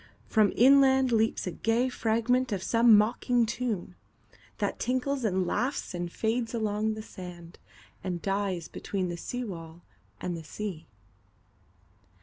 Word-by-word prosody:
From 215 -2 +3
inlandLeaps 265 -3 +4
a 180 - -2
gay 225 +7 +1
fragment 245 +1 +1
of 190 -2 -2
some 230 0 +6
mocking 235 +2 +2
tune, 220 -6 -3 0.6
That - - -2
tinkles 260 +2 -1
and 190 -4 +1
laughs 250 +8 -2
and 175 -1 -4
fades 230 +3 -1
along 215 -1 0
the 215 - -7
sand, 175 -4 -10 0.4
And 180 -2 -3
dies 195 -2 -2
between 190 -3 -3
the 175 - -3
seawall 175 -6 -6 0.4
and 175 -1 -3
the 165 - -7
sea. 185 0 -6
215 Hz, 130 wpm, -28 LUFS, 180-245 Hz, 0.6 s, some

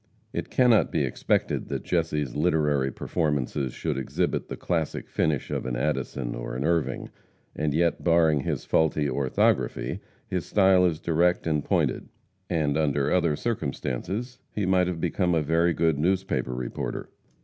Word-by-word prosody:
It - - -3
cannot 125 -4 +4
be 75 - +1
expected 65 - 0
that - - -3
Jesse's 75 -7 -1
literary 75 -4 +2
performances 70 -3 -1
should 65 - -3
exhibit 65 - -1
the - - -6
classic 80 -3 -2
finish 75 -4 -1
of - - -2
an 60 - -2
Addison - - -2
or - - -5
an 65 - -2
Irving, 85 0 0 0.4
and 75 -1 0
yet 85 +3 +1
barring 80 -3 +4
his 65 - -3
faulty 75 -2 +2
orthography, 65 -2 0 0.3
his 90 -2 -2
style 95 -2 +5
is 80 -3 -2
direct 85 +1 +1
and 75 -3 0
pointed, - - 0 0.4
and 75 -4 +1
under 70 -3 +1
other 85 -4 +2
circumstances 110 - -3
he 105 - -2
might 90 -1 +3
have 90 -2 -3
become 90 +1 +1
a 80 - +2
very 85 +3 +2
good 80 -2 +1
newspaper 85 -8 0
reporter. 60 -1 -4
80 Hz, 150 wpm, -26 LUFS, 70-90 Hz, 0.4 s, style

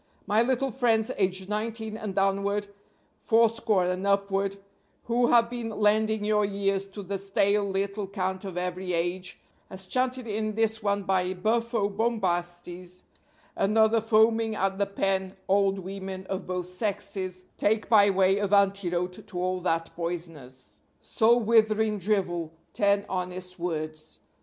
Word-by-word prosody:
My 210 +3 +3
little 260 +2 +1
friends 230 -3 +1
aged 190 -1 0
nineteen 220 +1 -3
and 215 -3 -5
downward 200 +1 +1 0.5
fourscore 225 -4 +2
and 180 +2 -1
upward 200 0 +1 0.5
who 240 +1 +2
have 235 -1 +5
been 235 -1 -5
lending 215 0 +1
your 210 0 +2
ears 195 -1 0
to 200 +1 -8
the 195 +1 -4
stale 200 +1 +1
little 200 +1 -2
cant 190 -1 -3
of 190 -3 -6
every 180 0 -3
age, 175 +2 -2 0.3
as 190 0 -9
chanted 255 +4 -1
in 215 -1 -2
this 225 0 0
one 200 -1 0
by 185 -1 0
Buffo 225 +2 0
Bombastes 180 -4 -2 0.5
and 210 +3 +1
other 220 +1 +4
foaming 225 0 +3
at 195 -1 -1
the 200 - +1
pen 195 -1 -1
old 195 0 +3
women 190 0 -6
of 190 0 -4
both 180 -1 -2
sexes 185 -1 -3
take 220 +1 +1
by 205 -3 +6
way 195 0 +3
of 205 -1 -1
antidote 185 -3 +1
to 180 - -6
all 185 0 -1
that 165 -2 -1
poisonous, 165 -7 -6 0.2
soul 235 +2 +3
withering 220 -1 +3
drivel, 175 -5 -1 0.2
ten 200 0 +2
honest 180 0 -5
words. 155 -2 -4
200 Hz, 140 wpm, -27 LUFS, 185-215 Hz, 0.5 s, by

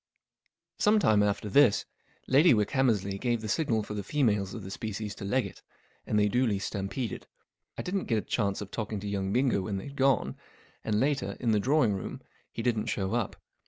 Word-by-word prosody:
Some 210 +1 +4
time 110 - +4
after 105 0 0
this, 125 +1 +4 0.4
Lady 145 +2 +5
Wickhammers 110 -1 +2
ley 100 0 -4
gave 120 -1 0
the 110 - -5
signal 110 -1 +1
for 105 - -6
the 105 - -3
females 105 -4 0
of 110 - -7
the 95 - -7
species 105 0 -4
to 100 - -8
leg 125 +6 +1
it, - - -10 0.5
and 105 - +1
they 105 0 +4
duly 115 -1 +1
stampeded. 100 +4 -4 0.5
I - - -3
didn't 190 +1 -2
get 115 - +1
a - - +1
chance 100 -4 -1
of 100 - -7
talking 110 -2 -3
to 105 - -5
young 100 -1 -2
Bingo 125 -3 +2
when 100 +1 -3
they'd 140 +9 -7
gone, 135 -1 +2 0.5
and 105 -1 0
later, 140 +3 0
in 120 -3 +1
the 105 - +3
drawing 125 -1 +3
room, 95 - -6 0.3
he 115 - -5
didn't 115 -2 0
show 95 -2 -1
up. 120 -3 -1
110 Hz, 200 wpm, -29 LUFS, 100-130 Hz, 0.5 s, Lady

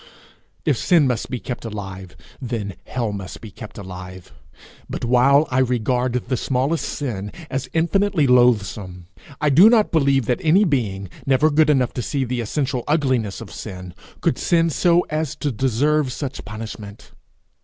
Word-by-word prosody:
If - - +2
sin 170 -5 +4
must 125 -3 -1
be 125 - -3
kept 125 +1 -6
alive, 95 -5 -7 0.3
then 115 -6 -4
hell 120 -4 -2
must 100 -2 -7
be 110 - -10
kept 110 +2 -11
alive; 95 -3 -9 0.6
but - - -4
while 135 +5 +4
I 125 - +2
regard 125 0 +1
the 125 +1 -1
smallest 135 +7 0
sin 105 -9 -4 0.2
as 130 0 -3
infinitely 170 0 +2
loathsome, 105 -8 +2 0.3
I 150 -1 +2
do 180 +11 +8
not 225 -3 +3
believe 140 -5 +2
that 185 - 0
any 180 +5 +4
being, 110 - -1 0.2
never 140 +4 +4
good 155 +1 +4
enough 130 -5 +2
to 125 - -3
see 135 +3 -1
the 125 0 -2
essential 130 +2 -2
ugliness 130 -9 0
of - - -9
sin, 90 -4 -8 0.3
could - - 0
sin 165 -1 +2
so 175 +3 +3
as 155 -1 -2
to 145 -1 -2
deserve 135 +4 +1
such 135 +1 -5
punishment. 105 -1 -8
125 Hz, 160 wpm, -21 LUFS, 105-150 Hz, 0.6 s, do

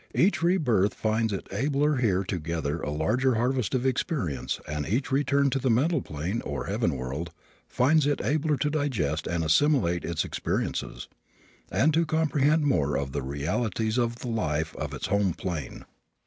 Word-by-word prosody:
Each 190 +1 +3
rebirth 125 - +2
finds 110 0 0
it 100 - -4
abler 140 +7 +1
here 100 -6 +2
to 90 -1 -3
gather 80 -1 -3
a - - -3
larger 120 - +1
harvest 125 0 0
of 130 0 0
experience 125 - -1
and 75 -1 -3
each 130 +8 -1
return 140 0 +2
to 135 - 0
the 130 - 0
mental 140 +6 +2
plane, 85 +9 -3
or - - -4
heaven 100 - 0
world, 70 +7 -4 0.4
finds 145 +3 +3
it 145 - +1
abler 150 +5 +1
to 150 +1 0
digest 110 - -1
and 85 -1 -1
assimilate 90 - +2
its 85 -2 -1
experiences, - - -3 0.6
and 155 +3 +3
to 165 +1 +2
comprehend 155 -1 +2
more 75 - +2
of 70 -1 -3
the 70 - -2
realities 105 - -1
of 120 -1 0
the 120 - -8
life 80 -9 -1
of - - -4
its - - -4
home 100 -3 +1
plane. 85 -9 -5
115 Hz, 170 wpm, -27 LUFS, -, 0.6 s, Each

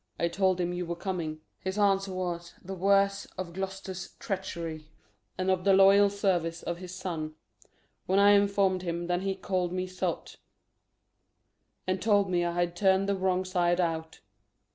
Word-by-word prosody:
I 170 - +1
told 190 0 +1
him 175 0 -1
you 175 -1 -3
were 170 - -2
coming: 170 -4 -4 0.2
His 190 +2 -4
answer 195 -1 +2
was, 175 -2 -4
'The 195 - -6
worse.' 195 +1 +2
Of 180 -2 -5
Gloucester's 190 0 -5
treachery 165 -5 -5 0.5
And 185 +1 +1
of 185 -1 0
the 195 0 +5
loyal 195 +1 +7
service 175 -5 -1
of 170 0 -4
his 180 0 -8
son 165 -4 -4 0.7
When 190 - +2
I 200 0 +7
inform'd 200 -2 +3
him, 170 -1 -3
then 175 +1 0
he 195 0 -1
call'd 185 -2 -1
me 185 0 -2
sot 185 0 -4 1.5
And 185 0 -1
told 205 -3 +3
me 175 -1 +2
I 170 0 -1
had 175 0 -1
turn'd 190 +1 +3
the 200 - +1
wrong 185 -1 0
side 175 -1 +1
out. 160 -2 -2
185 Hz, 165 wpm, -29 LUFS, 175-195 Hz, 1.5 s, loyal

